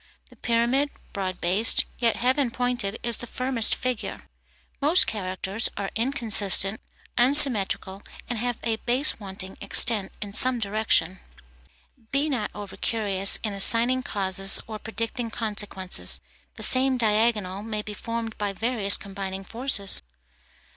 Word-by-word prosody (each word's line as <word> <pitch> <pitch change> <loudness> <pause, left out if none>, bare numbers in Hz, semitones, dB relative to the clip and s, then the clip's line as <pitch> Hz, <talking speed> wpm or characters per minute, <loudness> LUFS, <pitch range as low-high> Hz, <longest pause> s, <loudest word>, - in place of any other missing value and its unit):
The - - -18
pyramid, 240 +5 -1 0.2
broad 185 -2 -5
based, 190 +6 +4
yet 235 -2 0
heaven 255 +1 0
pointed, 240 -4 -3
is 235 -2 0
the 240 - -3
firmest 255 -2 +2
figure. 255 -3 -5 0.6
Most 310 +6 +4
characters 195 +1 -4
are 200 -1 -5
inconsistent, 220 -5 +3 0.4
unsymmetrical, 240 -7 +2 0.3
and 240 -3 -5
have 245 0 -3
a 225 -1 -2
base 250 +5 +1
wanting 190 -2 -8
extent 205 0 +4
in 205 -1 -7
some 255 +3 +7
direction. 200 -4 -1 0.9
Be 280 +3 -1
not 225 -6 -3
over 205 -2 -10
curious 200 -4 +1
in 215 -2 -2
assigning 230 +6 +4
causes 195 -4 -1
or 215 -1 -9
predicting 230 +2 -5
consequences; 210 -4 +2 0.4
the - - -2
same 260 0 +2
diagonal 215 -4 -1
may 215 -1 -5
be 210 - -8
formed 230 +1 -6
by 205 -1 -3
various 220 -1 +3
combining 195 -1 -7
forces. 225 -3 -2
220 Hz, 130 wpm, -23 LUFS, 200-245 Hz, 0.9 s, some